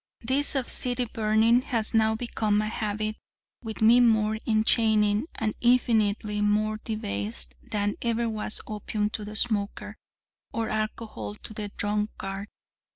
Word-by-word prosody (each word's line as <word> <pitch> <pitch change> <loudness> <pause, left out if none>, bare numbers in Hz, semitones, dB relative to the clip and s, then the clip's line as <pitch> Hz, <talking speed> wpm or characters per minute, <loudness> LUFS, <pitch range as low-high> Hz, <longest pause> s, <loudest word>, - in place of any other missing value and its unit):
This 270 +5 +1
of 265 -3 0
city 245 0 +3
burning 220 +2 +2
has 235 -5 +4
now 220 0 +3
become 220 -3 -1
a 215 0 -1
habit 215 0 -3 0.5
with 220 -1 -4
me 235 +3 +7
more 220 -2 +3
enchaining 220 +1 +2
and 215 -1 -1
infinitely 220 -4 +2
more 215 +1 +1
debased 100 - -4
than 205 -1 -1
ever 235 0 0
was 215 -1 -1
opium 210 0 -3
to 220 - -5
the 210 +1 -8
smoker, 210 -1 -1 0.5
or 225 -1 -2
alcohol 215 - -4
to 215 - -11
the 210 -1 -5
drunkard. 205 -1 -3
215 Hz, 135 wpm, -26 LUFS, 210-225 Hz, 0.5 s, me